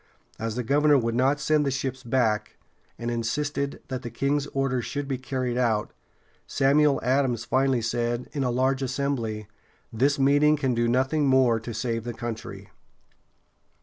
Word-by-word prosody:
As 115 Hz, 0 st, -3 dB
the 125 Hz, -, -2 dB
governor 145 Hz, +4 st, +4 dB
would 115 Hz, -2 st, 0 dB
not 135 Hz, +4 st, +2 dB
send 150 Hz, 0 st, +2 dB
the 140 Hz, -, 0 dB
ships 130 Hz, -1 st, -3 dB
back, 115 Hz, -4 st, 0 dB, 0.4 s
and 120 Hz, 0 st, -3 dB
insisted 140 Hz, +4 st, -2 dB
that 130 Hz, -1 st, -3 dB
the 120 Hz, -, -6 dB
king's 140 Hz, +3 st, -1 dB
orders 135 Hz, -3 st, -1 dB
should 145 Hz, +3 st, -4 dB
be 135 Hz, -2 st, -2 dB
carried 130 Hz, -2 st, -2 dB
out, 110 Hz, -4 st, 0 dB, 0.5 s
Samuel 140 Hz, +1 st, +3 dB
Adams 125 Hz, -3 st, +1 dB
finally 130 Hz, 0 st, +1 dB
said, 120 Hz, +1 st, -1 dB
in 140 Hz, -, -1 dB
a 125 Hz, -, 0 dB
large 130 Hz, +2 st, +1 dB
assembly: 125 Hz, -6 st, -2 dB, 0.5 s
"This 140 Hz, +6 st, +2 dB
meeting 145 Hz, +2 st, +4 dB
can 135 Hz, -4 st, 0 dB
do 120 Hz, 0 st, +1 dB
nothing 135 Hz, +5 st, +1 dB
more 130 Hz, -4 st, +4 dB
to 115 Hz, +1 st, -7 dB
save 115 Hz, 0 st, -2 dB
the 120 Hz, -1 st, -5 dB
country." 115 Hz, -2 st, -7 dB
130 Hz, 160 wpm, -26 LUFS, 120-140 Hz, 0.5 s, governor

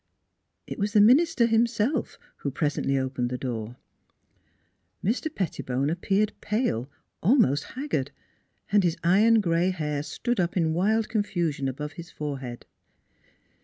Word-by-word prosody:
It -, -, -7 dB
was 205 Hz, +1 st, -1 dB
the 210 Hz, -, +5 dB
minister 265 Hz, +5 st, +5 dB
himself 230 Hz, +3 st, +1 dB, 0.2 s
who 140 Hz, -, -3 dB
presently 140 Hz, -1 st, 0 dB
opened 130 Hz, -2 st, -1 dB
the 125 Hz, -, -3 dB
door. 120 Hz, -3 st, -4 dB, 1.3 s
Mr. 230 Hz, +10 st, 0 dB
Pettibone 145 Hz, -, -2 dB
appeared 195 Hz, +5 st, 0 dB
pale, 205 Hz, -, -1 dB, 0.3 s
almost 170 Hz, -, +3 dB
haggard, 255 Hz, -, -2 dB, 0.6 s
and 205 Hz, -1 st, +4 dB
his 170 Hz, -2 st, +1 dB
iron 215 Hz, +6 st, +5 dB
gray 170 Hz, -1 st, +1 dB
hair 150 Hz, -5 st, -2 dB
stood 240 Hz, +9 st, -3 dB
up 175 Hz, +1 st, 0 dB
in 160 Hz, -2 st, +2 dB
wild 215 Hz, +6 st, +1 dB
confusion 175 Hz, -10 st, -1 dB
above 150 Hz, +3 st, -4 dB
his 170 Hz, +1 st, -10 dB
forehead. 135 Hz, -5 st, -6 dB
175 Hz, 130 wpm, -26 LUFS, 140-220 Hz, 1.3 s, the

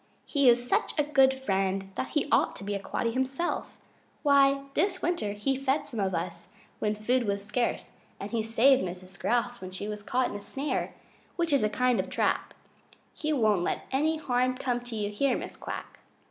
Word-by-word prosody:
He 280 Hz, -4 st, +4 dB
is 240 Hz, +1 st, +3 dB
such -, -, 0 dB
a 295 Hz, -, +4 dB
good 270 Hz, -2 st, +5 dB
friend 195 Hz, -6 st, -1 dB
that 260 Hz, -, -3 dB
he 295 Hz, -, 0 dB
ought -, -, +3 dB
to -, -, -8 dB
be 205 Hz, +1 st, -2 dB
a 200 Hz, -, -1 dB
Quaddy 230 Hz, +3 st, -2 dB
himself. 265 Hz, +6 st, -2 dB, 0.5 s
Why, 275 Hz, -1 st, +5 dB
this 390 Hz, +5 st, +2 dB
last -, -, -12 dB
winter 340 Hz, -13 st, 0 dB
he 210 Hz, +6 st, 0 dB
fed 275 Hz, +2 st, 0 dB
some 235 Hz, -6 st, -6 dB
of 190 Hz, -2 st, 0 dB
us 170 Hz, +1 st, -4 dB, 0.3 s
when 210 Hz, 0 st, 0 dB
food 240 Hz, +3 st, +1 dB
was 200 Hz, 0 st, -1 dB
scarce, 235 Hz, +4 st, -1 dB, 0.3 s
and 200 Hz, -, -6 dB
he 230 Hz, -1 st, 0 dB
saved 230 Hz, +5 st, +4 dB
Mrs. 185 Hz, 0 st, -7 dB
Grouse 245 Hz, 0 st, 0 dB
when 185 Hz, -, -6 dB
she 190 Hz, +2 st, -5 dB
was 210 Hz, -1 st, -5 dB
caught 250 Hz, +4 st, 0 dB
in -, -, -6 dB
a 205 Hz, -, -5 dB
snare, 275 Hz, +8 st, -2 dB, 0.4 s
which 340 Hz, -3 st, 0 dB
you 280 Hz, -, +6 dB
know 215 Hz, -, +1 dB
is 210 Hz, -, 0 dB
a 210 Hz, -, -8 dB
kind 250 Hz, -1 st, +3 dB
of -, -, -2 dB
trap. -, -, 0 dB, 0.6 s
He 310 Hz, -, -2 dB
won't 215 Hz, -, +3 dB
let 175 Hz, -, -2 dB
any 310 Hz, +4 st, +2 dB
harm 255 Hz, -3 st, +1 dB
come 245 Hz, -2 st, -1 dB
to 240 Hz, -2 st, -6 dB
you 205 Hz, -1 st, -2 dB
here, 255 Hz, +5 st, +1 dB
Mrs. -, -, -8 dB
Quack." -, -, -7 dB
245 Hz, 215 wpm, -28 LUFS, 205-270 Hz, 0.6 s, you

